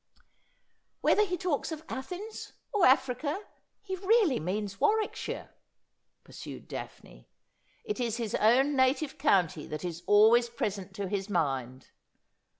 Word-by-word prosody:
' - - -46
Whether 425 - +4
he 360 0 -2
talks 330 -3 -1
of 315 0 -6
Athens 360 +12 -7
— - - -48
or 410 -8 +5
Africa 265 +8 +1 0.2
— - - -51
he 380 -2 -4
really 390 - +3
means 195 +4 -3
Warwickshire,' 435 0 -1 0.7
pursued - - -10
Daphne. - - -9 0.3
' - - -38
It 420 - -3
i§ 235 -3 -1
his 230 -4 -3
own 265 +6 +4
native 270 +2 +1
county 180 - +2
that 155 +3 -5
is 170 -1 -5
always 225 +3 +6
present 205 -5 -4
to 200 -1 -3
his 195 +1 -3
mind. 135 -8 -2
250 Hz, 145 wpm, -29 LUFS, -, 0.7 s, always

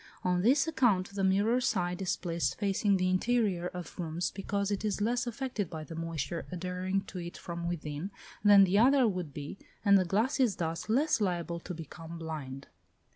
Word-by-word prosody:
On 180 -1 +2
this 275 - +4
account 220 -12 +2
the 200 -1 -2
mirror 205 +6 +3
side 180 -7 0
is 185 - 0
placed 170 -6 -1
facing 200 -1 +2
the 185 0 +1
interior 185 -2 +1
of 180 0 -8
rooms, 170 +1 -2
because 200 +1 -2
it 200 0 -2
is 210 -2 -1
less 240 +3 0
affected 240 - -3
by 160 -1 -6
the 165 - -9
moisture 165 0 -4
adhering 185 +2 -2
to 190 - -8
it 175 0 -7
from 170 0 -5
within, 155 0 -4 0.3
than 205 -1 +8
the 195 +2 +3
other 260 +1 +5
would 180 -7 -3
be, 145 +6 -7 0.3
and 200 -1 +7
the - - +3
glass 215 - 0
is 240 -7 +3
thus 165 +3 -3
less 275 +2 +2
liable 175 -3 -1
to 180 +1 -7
become 165 +1 -8
"blind." 145 -5 -6
185 Hz, 185 wpm, -31 LUFS, 170-210 Hz, 0.3 s, than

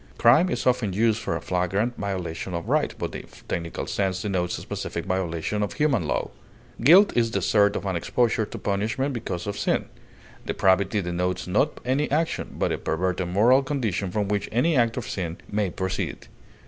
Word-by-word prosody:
Crime 135 +10 +5
is - - -2
often 120 -6 +2
used 110 +2 +2
for - - -2
a - - -4
flagrant 95 +7 0
violation 95 -3 -4
of 85 - -4
right, - - +2
but - - -4
in - - -5
the - - -17 0.2
technical 85 -1 -3
sense 95 -2 -1
denotes 90 -4 -1
specific 85 - -5
violation 95 +1 -1
of 105 - -1
human 140 - +1
law. 60 - -1 0.5
Guilt 180 - +7
is 115 -1 +3
desert 105 -3 +2
of - - -3
and 95 -2 -1
exposure 110 +5 +1
to - - -7
punishment 110 +8 -1
because 95 -7 -4
of 100 -1 -4
sin. - - +1 0.6
Depravity 95 +2 +2
denotes 90 +1 -2
not 105 +11 +1
any 135 +4 +1
action, 160 +3 -1
but - - 0
a - - -2
perverted 90 +2 -1
moral 115 +9 +4
condition 115 -9 -2
from 100 +2 -1
which 100 0 -1
any 150 +8 +2
act 115 -2 +2
of 125 - -4
sin 85 -3 -4
may 105 -2 0
proceed. 95 +1 -3
100 Hz, 180 wpm, -25 LUFS, 90-120 Hz, 0.6 s, Guilt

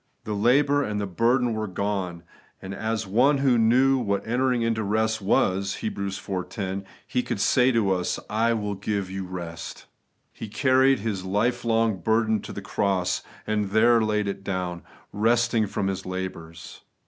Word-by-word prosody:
The 105 - -4
labour 140 +7 +3
and 105 -3 -2
the 100 - -1
burden 120 +6 +1
were 110 0 -2
gone; 95 -3 -3 0.4
and 95 +1 -7
as 110 +1 -2
one 125 +9 +3
who 135 -3 +3
knew 130 +4 +4
what 100 -4 -1
entering 125 0 +1
into 115 -1 0
rest 110 +1 0
was 95 0 +1
(Heb. 110 - -4
iv. 95 -1 -4
10), 95 -1 -4 0.2
He 125 - 0
could 120 -4 -4
say 125 +5 +4
to 110 -5 +2
us, 90 -1 0
'I 115 +2 +1
will 105 -2 -2
give 100 -1 -3
you 95 0 -4
rest' 85 -2 -7 0.5
He 110 - -7
carried 130 +3 +3
His 100 -4 -3
life 115 +6 0
long 115 -3 +1
burden 110 +2 +1
to - - -8
the 100 - -7
cross, 95 -3 0 0.2
and 105 -2 -1
there 115 +3 +4
laid 105 -1 0
it 100 0 -4
down, 90 -3 -3 0.3
'resting 115 +1 +2
from 95 - -2
His 95 -1 -2
labours.' 90 -3 -7
105 Hz, 170 wpm, -25 LUFS, 95-115 Hz, 0.5 s, knew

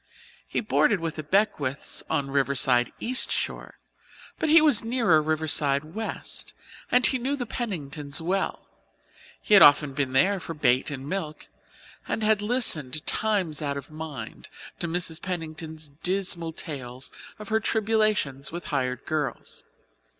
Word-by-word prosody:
He - - -1
boarded 145 - +2
with 165 -1 -3
the - - -2
Beckwiths 150 -5 0
on 145 -3 0
the 135 - -8
Riverside 135 -3 +2
East 255 +2 +1
Shore, - - -2 0.6
but 320 - 0
he 325 +2 +8
was 300 -9 +4
nearer 225 -9 +3
Riverside 150 -2 +1
West, 220 +2 -5 0.4
and 250 0 +5
he 260 - +3
knew 265 +4 -1
the 255 -3 -4
Penningtons 150 - -4
well. 185 +4 -2 0.8
He - - +1
had 205 - +9
often 145 -1 +7
been 135 -2 -2
there 190 +9 +3
for 165 -1 -7
bait 130 -3 +2
and 140 -1 -6
milk 155 -3 -5 0.6
and 220 - -2
had 215 -1 +3
listened 160 - +1
times 195 -9 0
out 140 -1 -2
of 140 +2 -9
mind 155 -2 -8 0.3
to 170 - -2
Mrs. 165 -1 -1
Pennington's 160 -3 -5
dismal 170 +2 -1
tales 130 -6 -7 0.3
of 210 -1 -10
her 220 0 +2
tribulations 215 - 0
with 170 -1 -6
hired 130 -2 -1
girls. 155 -3 -3
160 Hz, 145 wpm, -26 LUFS, 140-210 Hz, 0.8 s, had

